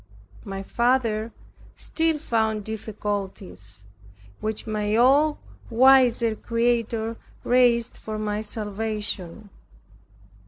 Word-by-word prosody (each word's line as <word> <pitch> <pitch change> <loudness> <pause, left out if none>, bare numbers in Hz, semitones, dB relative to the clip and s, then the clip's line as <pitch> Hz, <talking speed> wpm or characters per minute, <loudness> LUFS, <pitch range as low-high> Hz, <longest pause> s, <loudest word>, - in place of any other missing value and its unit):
My 195 -1 -6
father 230 -1 0 0.4
still 325 -1 -1
found 220 -7 -1
difficulties, 195 - -6 0.5
which 215 0 -4
my 210 -1 -1
all 280 +6 +4 0.3
wise 255 0 +5 0.2
Creator 230 -1 0 0.3
raised 245 -2 +3
for 215 0 -6
my 210 0 -2
salvation. 210 -2 -4
220 Hz, 80 wpm, -24 LUFS, 210-240 Hz, 0.5 s, wise